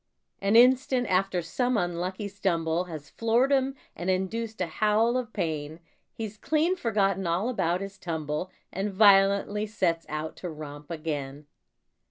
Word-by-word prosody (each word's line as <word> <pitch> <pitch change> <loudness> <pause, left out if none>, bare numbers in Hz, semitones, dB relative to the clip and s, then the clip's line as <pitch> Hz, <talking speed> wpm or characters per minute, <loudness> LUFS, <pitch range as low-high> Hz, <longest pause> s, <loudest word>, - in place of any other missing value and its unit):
An 200 +2 +2
instant 255 +1 +5
after 185 -2 +1
some 245 +8 0
unlucky 180 +3 -2
stumble 175 -4 0
Has 155 -4 -9
floored 235 +4 +2
him 270 0 +2 0.2
and 175 +3 -3
induced 215 +4 -2
a 180 - +1
howl 215 +7 +2
of 250 -3 -2
pain, 160 -4 -3 0.3
He's 220 -2 -6
clean 315 +7 +1
forgotten 195 - 0
all 180 +8 0
about 185 -6 0
his 195 0 -7
tumble 160 0 -3 0.2
And 195 +2 -2
violently 200 +1 +4
sets 175 -6 -1
out 155 +1 -4
to 180 - -5
romp 150 -1 -9
again. 150 -3 -4
195 Hz, 145 wpm, -27 LUFS, 165-220 Hz, 0.3 s, instant